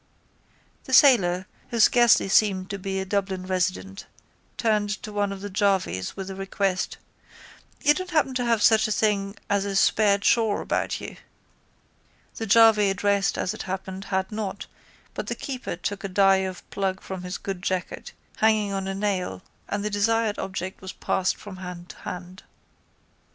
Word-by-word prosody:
The 260 - -6
sailor, 190 -11 +5 0.2
who 235 - -3
scarcely 240 -1 +5
seemed 195 -2 +2
to 200 - -4
be 190 0 -3
a 190 - -3
Dublin 190 -1 -2
resident, 185 +1 -2 0.5
turned 215 -3 +1
to 210 - -7
one 205 -1 0
of 195 -1 -7
the 205 - -5
jarvies 190 - 0
with 195 - -4
the - - -5
request: 195 0 -2 0.9
—You 295 -1 +6
don't 370 +4 -5
happen 305 -6 +1
to 250 -1 -1
have 230 -3 +2
such 220 -1 +5
a - - -3
thing 205 -2 0
as 200 -1 +1
a 200 -1 -3
spare 200 +1 +4
chaw 220 +1 +2
about - - -1
you? - - -8 1.2
The 225 - -4
jarvey 215 -1 +6
addressed 200 +1 +1
as 185 - -1
it - - -7
happened 190 0 -5
had 190 0 -2
not 205 -2 -4 0.5
but - - -5
the - - -2
keeper 260 -8 -5
took 200 +4 -4
a - - -2
die 195 0 +4
of 190 -1 -4
plug 190 -1 -1
from 190 -1 -6
his 180 +1 -5
good 195 -2 -5
jacket 185 -1 -3 0.3
hanging 215 -2 +2
on 195 -1 -3
a 195 - -3
nail 190 - -2 0.3
and 205 0 -2
the 210 - -1
desired 220 +1 +1
object 190 -1 -5
was 190 0 -7
passed 190 -1 -1
from 200 -3 -10
hand 180 -1 -8
to - - -11
hand. 180 +2 -8
195 Hz, 170 wpm, -25 LUFS, 190-210 Hz, 1.2 s, You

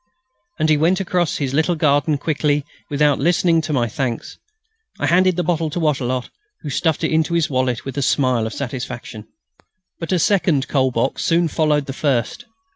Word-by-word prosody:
And 155 - +1
he 155 -1 +4
went 170 +5 +2
across 180 -3 0
his 135 -3 -2
little 160 +4 +2
garden 145 -1 +2
quickly, 145 -1 0 0.2
without 145 0 +2
listening 170 +1 +2
to 155 - -5
my 125 -5 +1
thanks. 120 0 -4 0.6
I - - 0
handed 185 +1 +3
the 180 - -1
bottle 165 -1 0
to 165 - -4
Wattrelot, 130 -5 -1 0.3
who 145 - -5
stuffed 160 +3 0
it 160 - 0
into 160 +2 +1
his 165 -3 +1
wallet 130 -2 -1
with 135 +1 -4
a - - -1
smile 130 -4 +1
of 110 - -7
satisfaction. 125 -4 -6 0.7
But 165 - -5
a 185 - +3
second 170 -7 +2
"coal 130 -2 +2
box" 120 +2 -1
soon 170 0 +2
followed 150 -2 +1
the 135 - -5
first. 140 - -1
150 Hz, 185 wpm, -20 LUFS, 130-165 Hz, 0.7 s, he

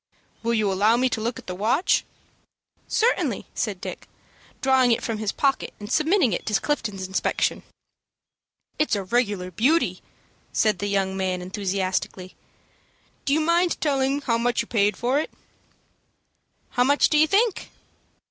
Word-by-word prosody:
"Will 235 0 0
you 210 -3 +1
allow 210 +5 +3
me 255 +1 +2
to 225 - -2
look 235 +2 -2
at - - -11
the 180 - -5
watch?" 225 - +1 0.8
"Certainly," 465 +3 +1
said - - -2
Dick, - - -7 0.5
drawing 260 -2 +3
it 230 - +1
from 225 -2 -3
his 215 -2 -1
pocket, 275 -2 0
and 205 0 -8
submitting 310 - +3
it - - -2
to 210 -2 +2
Clifton's 210 -10 -2
inspection. 190 - 0 1.2
"It's 305 -7 +2
a 200 - -2
regular 200 -3 -1
beauty," 275 - +1 0.5
said 215 -4 +1
the 205 - -2
young 195 -1 0
man, 185 -1 -1
enthusiastically. 185 -1 -3 0.9
"Do 280 - +2
you 315 - +3
mind 340 +2 +2
telling 275 -1 +1
how 230 -5 0
much 240 +1 +1
you - - -14
paid 205 -3 +1
for 255 +4 +1
it?" 310 - -3 1.4
"How 245 - +2
much 285 +3 +4
do 300 - +2
you 310 - +5
think?" 420 +3 +1
230 Hz, 155 wpm, -24 LUFS, 200-280 Hz, 1.4 s, you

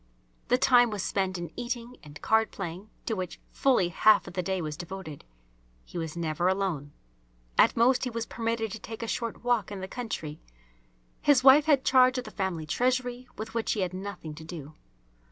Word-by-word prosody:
The 250 - +4
time 245 -2 +5
was 210 -3 -3
spent 190 -2 -1
in 175 -1 -6
eating 240 0 -5
and 145 -1 -12
card 220 0 +3
playing, 190 +2 -6 0.2
to 225 - -1
which 185 -3 -5
fully 250 -10 +2
half 215 +4 +5
of - - -9
the 185 - -1
day 190 +1 -1
was 155 -3 -4
devoted. 175 -3 -8 0.6
He 175 - -6
was 160 0 -5
never 165 +1 0
alone. 185 -7 -1 0.6
At - - +5
most 245 +2 +4
he 255 - -1
was 230 -1 -3
permitted 230 -2 -2
to 220 - -6
take 225 +1 -7
a - - -3
short 230 0 -3
walk 240 -5 +1
in 200 - -5
the 190 - -5
country. 175 -11 -5 0.8
His 275 -3 +4
wife 275 +3 +8
had 285 -4 +3
charge 255 0 +5
of 250 - -2
the 215 - -10
family 185 -5 -2
treasury, 250 - 0
with 220 +1 -6
which 230 -1 0
he 210 - -2
had 185 -1 -1
nothing 185 -4 -6
to 160 +1 -10
do. 160 -3 -8
210 Hz, 195 wpm, -28 LUFS, 175-245 Hz, 0.8 s, wife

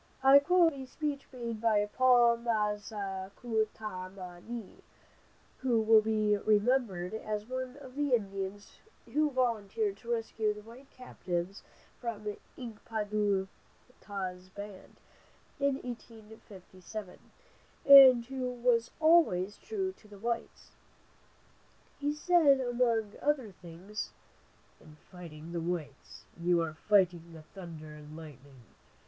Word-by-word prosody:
I 270 +1 +9
quote 335 +2 +4
from 275 - -8
a 260 - -8
speech 290 0 -4
made 235 -4 -5
by 215 -3 +3
Paul 240 +1 +4
Ma 215 -3 0
za 195 -2 -6
ku 220 -3 0
ta 185 -4 -7
ma 180 -2 -10
ni, 230 0 -8 0.8
who 245 -3 +2
will 220 0 +6
be 215 -1 +1
remembered 210 -3 +1
as 215 -1 -4
one 255 +2 -5
of 265 -3 -12
the 290 -3 +2
Indians 195 -1 -5 0.3
who 305 +1 +3
volunteered 220 -5 -1
to 235 +3 -7
rescue 225 -2 -1
the 210 - -11
white 245 +5 -14
captives 190 -7 -5 0.4
from 215 -4 -4 0.2
Ink 230 -5 -9
pa 220 -2 -2
du 205 -2 0 0.5
ta's 185 -2 -6
band, 200 0 -10 0.6
in 280 -1 +2
1857, 215 -5 -10 0.7
and 265 -4 +10
who 260 0 -3
was 240 -1 +1
always 310 - +4
true 385 -3 -3
to 215 - -20
the 205 -1 -13
whites. 230 +3 -4 1.3
He 290 0 0
said 300 -2 +4
among 235 -4 0
other 280 -7 0
things: 180 +4 -8 0.7
"In 155 - -16 0.2
fighting 165 -3 -10
the 170 -1 -3
whites, 165 -5 -5 0.2
you 175 0 +2
are 160 -2 -4
fighting 175 -2 +2
the 160 -1 -11
thunder 160 -3 -10
and 150 +1 -11
lightning. 140 -5 -13
215 Hz, 130 wpm, -31 LUFS, 190-250 Hz, 1.3 s, and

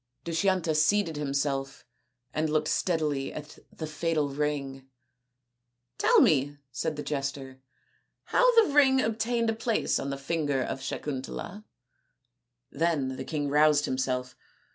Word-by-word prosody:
Dushyanta 170 0 +1
seated 160 +3 +2
himself 140 -1 -2 0.5
and 155 0 0
looked 155 0 +1
steadily 150 -6 0
at 150 0 -9
the 160 - -6
fatal 155 -1 -1
ring. 140 -2 -3 0.5
" 120 +1 -54
Tell - - +5
me," 145 -1 +3
said 155 +6 -2
the 145 - -5
jester, 135 -2 -4 0.3
" - - -44
how 485 -3 +6
the 290 - -4
ring 270 -2 +5
obtained 225 0 0
a - - -2
place 225 0 0
on 140 - -3
the 140 - -3
finger 145 -2 -1
of 135 - -4
Sakuntala." 150 +10 -5 1.1
Then 145 -4 0
the 130 - -5
king 145 0 -2
roused 150 +1 +4
himself. 130 -1 -2
150 Hz, 135 wpm, -28 LUFS, 135-165 Hz, 1.1 s, how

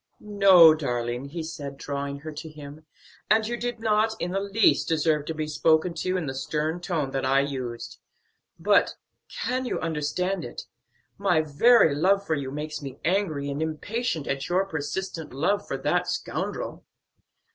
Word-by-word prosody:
"No, 195 -6 +7
darling!" 120 -4 -2
he 160 +4 -5
said, 140 -3 -7
drawing 140 0 -4
her 155 +1 -6
to 155 +2 -8
him, 150 0 -11 0.4
"and 220 +1 +4
you 240 - -2
did 240 0 -4
not 220 0 +2
in 175 - -2
the 195 - 0
least 200 +2 +2
deserve 155 -2 +1
to 160 - -3
be 155 0 -2
spoken 160 +3 +2
to 185 +3 -1
in 175 - -2
the 135 - -3
stern 155 +5 -2
tone 160 -7 -2
that 135 - -2
I 135 +1 +3
used. 130 -4 -5 0.6
But - - +3 0.3
can 255 +2 -2
you - - -2
understand 165 +4 -2
it? 120 - -7 0.6
my 180 -5 +3
very 160 +4 +5
love 195 +7 +2
for 160 - 0
you 140 -3 -2
makes 150 +2 -5
me 135 -2 -7
angry 165 -6 0
and 140 +2 -3
impatient 160 - -2
at 140 0 -3
your 185 +2 +2
persistent 160 -2 -5
love 200 +8 0
for - - -3
that - - 0
scoundrel." - - -4
160 Hz, 170 wpm, -26 LUFS, 140-195 Hz, 0.6 s, No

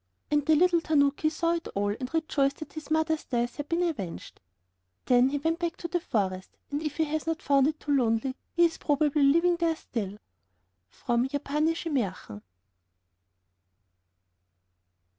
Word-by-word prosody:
And 295 -1 +3
the 315 - +6
little 345 +1 +4
tanoki 290 -1 +2
saw 335 +2 0
it 335 -1 -3
all, 205 +1 +1
and 255 +5 -5
rejoiced 285 -4 0
that 310 - -9
his 310 -1 -8
mother's 315 0 +1
death 240 -1 -2
had 290 0 -5
been 335 +1 +1
avenged. 210 - -4 0.7
Then 250 +1 +4
he 285 - -1
went 325 +4 -1
back 345 +2 -2
to 340 - -5
the 350 +1 -1
forest, 190 - -3
and 290 +1 -2
if 305 -2 -4
he 320 - +3
has 310 +1 -3
not 325 0 -1
found 275 -1 +4
it 310 0 -2
too 295 - -4
lonely, 245 +1 +1 0.2
he 345 0 +6
is 330 - -1
probably 295 0 +1
living 335 +5 +4
there 335 -1 +1
still. 210 -9 -5 0.7
[From 240 - -1
Japanische 305 +4 -1
Mährchen. 190 - -3
295 Hz, 160 wpm, -28 LUFS, 255-325 Hz, 0.7 s, the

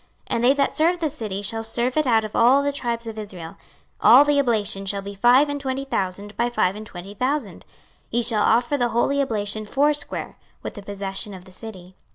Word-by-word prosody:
26:048:019 - - +1
And 235 - -1
they 255 +3 +6
that 280 -1 0
serve 335 +3 +3
the 320 -2 0
city 215 -8 -5
shall 225 +3 -2
serve 240 +3 -1
it 305 -2 +1
out 225 -2 +3
of 215 - -7
all 260 +4 +5
the 285 - 0
tribes 235 -4 -3
of 220 -1 -6
Israel. 180 -6 -7
26:048:020 195 - -20 0.5
All 265 +5 +9
the 290 -1 +2
oblation 215 -6 0
shall 200 0 -1
be 200 0 -7
five 245 +8 +5
and 285 0 -4
twenty 270 0 -3
thousand 200 -3 -3
by 235 +3 0
five 195 -5 +1
and 215 0 -8
twenty 190 +2 -9
thousand: 250 - -3 0.4
ye 240 +1 0
shall 220 -2 +2
offer 240 +7 +2
the 240 -1 +1
holy 275 +5 +1
oblation 215 -4 -1
foursquare, 290 +7 -1 0.2
with - - -5
the 205 - -9
possession 200 0 -5
of 180 -1 -12
the 185 - -15
city. 185 -3 -10
230 Hz, 220 wpm, -23 LUFS, 200-270 Hz, 0.5 s, All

